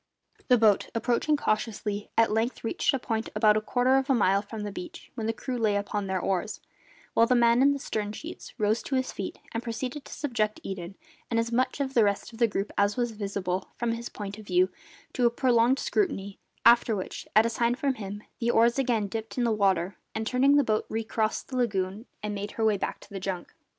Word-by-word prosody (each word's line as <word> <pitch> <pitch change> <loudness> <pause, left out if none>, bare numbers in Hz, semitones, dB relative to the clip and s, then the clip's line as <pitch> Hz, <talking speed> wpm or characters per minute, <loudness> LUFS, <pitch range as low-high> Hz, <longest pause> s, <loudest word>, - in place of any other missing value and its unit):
The 250 - +6
boat, 215 -3 +3
approaching 245 +6 +1
cautiously, 215 -3 -2
at 225 -2 +4
length 225 +3 -1
reached 225 - +1
a 270 - 0
point 225 -3 -2
about 210 0 +5
a 215 - +1
quarter 250 +4 +2
of 270 +1 0
a 270 - +5
mile 195 -3 +3
from 215 +1 -7
the 205 - -4
beach, 350 - -9
when 225 -3 -3
the - - +2
crew 250 +2 -4
lay 215 -3 +2
upon 205 0 -2
their 190 -1 0
oars, 190 +3 -1 0.5
while 230 - +5
the 250 - +3
man 235 0 +5
in 280 +1 +6
the 285 - 0
stern 210 -6 -3
sheets - - -9
rose 215 +2 +2
to 270 - -3
his 260 0 0
feet 195 - -5
and 230 - -2
proceeded 250 +4 -4
to - - -12
subject 225 -7 -1
Eden, 190 -1 -6 0.3
and 230 - +1
as 230 +1 -1
much 255 +4 +1
of 270 -1 -1
the 235 - +5
rest 200 +3 -1
of 225 - -12
the 235 - +5
group 200 -1 -3
as 200 +2 +2
was 240 -1 0
visible 195 -3 -3
from 240 -1 0
his 235 +1 -4
point 205 0 -7
of 215 - -12
view, 180 0 +3 0.4
to 245 -2 +3
a - - +4
prolonged 240 +1 +3
scrutiny, 285 - -1 0.3
after 235 -1 +6
which, 190 - -5
at 215 +1 +7
a - - +2
sign 235 +1 +1
from 275 0 0
him, 205 -2 -7 0.2
the 235 - 0
oars 235 +2 +4
again 240 -5 +1
dipped 220 +4 -5
in 245 - +2
the 235 - +2
water 195 -3 +1 0.2
and, 220 0 -2
turning, 260 +4 +4
the 290 - +5
boat 215 -3 0
recrossed 220 0 -1
the 260 - -3
lagoon 205 -2 -1 0.2
and 210 0 -2
made 205 0 -5
her 225 - 0
way 215 -1 +4
back 195 - -3
to - - -15
the 195 - -5
junk. 185 -2 -4
225 Hz, 230 wpm, -28 LUFS, 205-245 Hz, 0.5 s, at